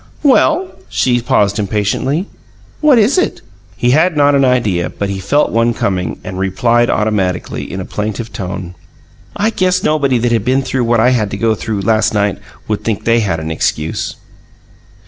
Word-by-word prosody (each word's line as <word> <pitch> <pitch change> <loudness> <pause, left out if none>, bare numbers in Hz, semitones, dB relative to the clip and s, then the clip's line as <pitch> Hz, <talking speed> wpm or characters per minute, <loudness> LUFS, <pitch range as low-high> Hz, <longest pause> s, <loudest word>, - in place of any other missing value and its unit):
"Well" 320 +6 +3 0.2
she 120 -1 +1
paused 105 -3 +1
impatiently 105 - -1 0.5
"what 300 -4 +5
is 230 - +3
it?" - - -1 0.4
He 120 - +2
had 160 +4 +3
not 145 0 +4
an 140 -1 +3
idea, 105 -10 +1
but 100 +3 -4
he 95 - -4
felt 140 +11 +1
one 115 0 +1
coming, 90 -2 -2
and 95 - -6
replied 115 +5 +1
automatically, 100 -4 -1
in 95 - -5
a 95 - -5
plaintive 110 +1 -4
tone: 90 -2 -5 0.6
"I 215 +2 +1
guess 185 -3 0
anybody 140 -4 +2
that 120 +1 0
had 115 - +1
been 130 +2 +1
through 130 -1 -1
what 115 0 +2
I 125 +3 +4
had 110 -5 +1
to 100 - -5
go 115 +2 +2
through, 110 -1 -3
last 110 +2 +1
night, 105 -2 0 0.3
would 105 -1 -2
think 110 -3 -2
they 115 0 +3
had 100 -7 -1
an 80 0 -5
excuse." 80 0 -2
115 Hz, 180 wpm, -15 LUFS, 100-135 Hz, 0.6 s, what